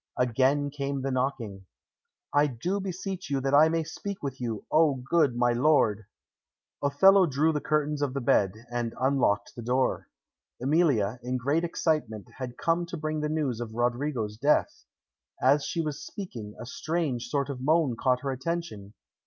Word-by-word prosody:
Again 135 +4 +2
came 140 -1 -3
the 135 - -1
knocking. 125 -7 -2 0.7
"I 145 +1 +4
do 160 - -2
beseech 190 -1 -5
you 140 -1 0
that 135 +1 -1
I 155 +2 +7
may 165 0 0
speak 195 +4 -7
with 135 -2 -5
you, 115 -4 -4
O 155 -3 +4
good 135 +1 +1
my 120 0 +2
lord." 120 -6 +2 0.7
Othello 185 +7 +5
drew 150 +3 +2
the 150 - -1
curtains 150 -1 0
of 140 -2 -1
the - - 0
bed, 110 -2 +1
and 120 -1 -2
unlocked 130 -7 +1
the 120 - -7
door. 125 +3 0 0.5
Emilia, 130 - +2
in 125 +2 -2
great 140 +7 0
excitement, 155 - -1
had 125 -2 -6
come 170 +1 0
to 175 - -6
bring 155 0 -2
the 150 - -1
news 145 -7 -1
of 110 -2 -6
Roderigo's 120 -2 -1
death. 145 +6 +1 0.5
As 140 +3 +3
she 170 - -1
was 150 -3 -4
speaking, 115 - -8
a 120 - -6
strange 145 -3 -2
sort 140 +2 -1
of 130 -2 -7
moan 150 -2 +2
caught 125 +1 +1
her 140 - -2
attention. 130 -8 -4
140 Hz, 170 wpm, -28 LUFS, 120-155 Hz, 0.7 s, I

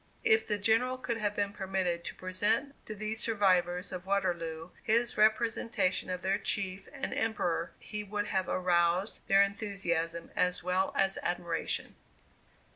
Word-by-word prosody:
If 445 -1 +4
the 210 - 0
General 225 +5 +2
could 235 -2 -3
have 205 -1 -1
been 200 -1 -1
permitted 190 -3 -1
to - - -5
present 210 +9 0
to 215 - -5
these 215 +1 -2
survivors 185 -5 +2
of 185 0 -6
Waterloo 170 -4 -1
his 235 +1 +2
representation 220 -3 +2
of 180 0 -3
their 195 +2 +1
chief 195 -1 -1
and - - -4
Emperor, 175 -7 -1
he 210 -1 -6
would 205 0 -2
have 190 -1 0
aroused 180 +2 +1
their 195 0 +6
enthusiasm 175 -5 -2
as 180 0 +1
well 185 +1 +1
as 195 0 +3
admiration. 175 -2 -2
195 Hz, 145 wpm, -31 LUFS, 180-215 Hz, -, their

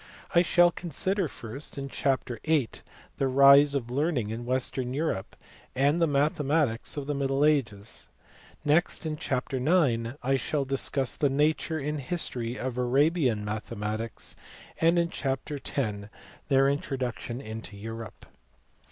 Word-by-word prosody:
I 170 - +6
shall 175 0 +5
consider 185 +3 -1
first, 130 +3 -8
in 140 0 -4
chapter 130 -4 -1
vin., 155 -6 +2 0.5
the 135 - +1
rise 140 +2 +7
of 120 -3 -2
learning 135 -5 0
in 115 +2 -5
western 130 0 -1
Europe, 145 -11 -2 0.4
and 145 +6 +2
the 165 - +4
mathematics 145 -3 +1
of 145 - -3
the 145 - -1
middle 140 +1 +1
ages. 110 - -1 0.6
Next, 160 +3 +2
in 155 -1 -2
chapter 135 -2 -2
ix., 130 -5 +2
I 135 +2 +2
shall 140 +2 -1
discuss 135 -1 0
the 145 - +2
nature 155 +3 +1
and 150 0 -3
history 125 -5 -2
of 125 -1 -3
Arabian 130 -3 +2
mathematics, 105 +1 -4 0.4
and 165 +1 +4
in 170 0 +1
chapter 140 +1 -3
x. 105 -7 -2 0.4
their 135 -1 +4
introduction 130 -4 -2
into 110 -4 -8
Europe. 115 +2 -8
135 Hz, 135 wpm, -28 LUFS, 120-150 Hz, 0.6 s, rise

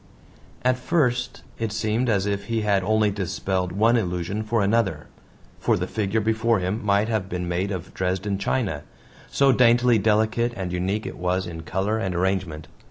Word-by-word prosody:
At 125 0 +2
first 125 -5 0 0.2
it 115 -2 -2
seemed 110 +3 0
as 100 -3 +2
if 100 -1 -2
he 115 -1 -1
had 100 -2 +2
only 110 +1 +2
dispelled 95 -1 -2
one 115 +5 +3
illusion 90 0 -2
for 110 0 0
another. 105 0 +1 0.5
For - - +2
the - - -2
figure 105 0 -1
before 110 +1 +2
him 95 +4 -2
might 100 +1 +2
have 110 -5 -1
been 90 0 -3
made 90 +3 -1
of 95 -3 -5
Dresden 95 +2 -1
china 100 - -1 0.5
so 140 -1 +4
daintily 120 -1 +4
delicate 110 +3 +1
and 95 -3 -4
unique 95 +4 -1
it - - -7
was 90 +1 0
in 80 -2 -7
color 95 +6 -1
and 95 -4 -2
arrangement. 90 -4 -1
100 Hz, 170 wpm, -24 LUFS, 95-115 Hz, 0.5 s, so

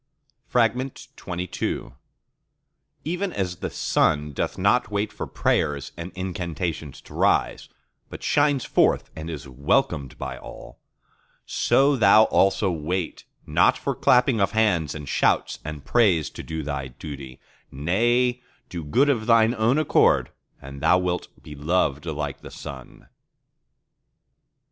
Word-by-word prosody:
XXII 120 -6 -2 1.1
Even 180 +4 -2
as 90 -3 -2
the - - -4
Sun 75 -1 +1
doth - - -2
not 100 +6 +2
wait 105 0 -2
for - - -5
prayers 70 -1 0
and 85 +2 -7
incantations 85 -5 -4
to - - -15
rise, - - +1 0.4
but - - -9
shines 145 -3 +2
forth - - +2
and 80 +1 -6
is 70 -4 -6
welcomed 70 - 0
by - - -6
all: 65 0 -11 0.7
so 140 +1 +3
thou 110 -2 +6
also 95 -2 +2
wait 85 +2 -3 0.2
not - - +3
for - - -2
clapping 125 -3 +3
of 100 0 +1
hands 90 -10 +1
and 75 -2 -7
shouts - - +1
and 75 -2 -7
praise 90 -3 +3
to - - -8
do 80 -1 -5
thy 70 -2 -4
duty; 65 0 -9 0.3
nay, 120 - +1 0.3
do 85 -2 -5
good 125 - +2
of 120 -6 0
thine 115 0 +5
own 115 +3 +2
accord, 155 -2 +3 0.3
and 70 +1 -10
thou 90 - +5
wilt 90 -1 -2 0.2
be 75 - -10
loved 75 0 0
like 75 -3 -4
the - - -10
Sun. 65 -3 -10
90 Hz, 130 wpm, -24 LUFS, 75-115 Hz, 1.1 s, thou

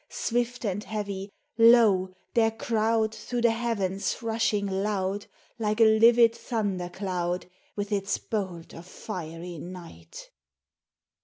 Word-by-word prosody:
Swift 245 +1 -2
and 205 0 -2
heavy, 200 -3 -4 0.3
lo, 225 -5 +6 0.2
their 225 -1 +4
crowd 225 0 0
Through 245 +1 -4
the 235 - +5
heavens 210 -5 -1
rushing 220 -2 0
loud, 195 0 -2 0.3
Like 215 0 -1
a - - +7 0.2
livid 230 0 +6
thunder 205 -7 -3
cloud 180 -2 -3 0.3
With 205 0 -4
its 200 -1 0
bolt 185 -6 -5
of 170 +2 -11
fiery 170 -3 -7
night 170 - -10
205 Hz, 115 wpm, -27 LUFS, 185-225 Hz, 0.3 s, a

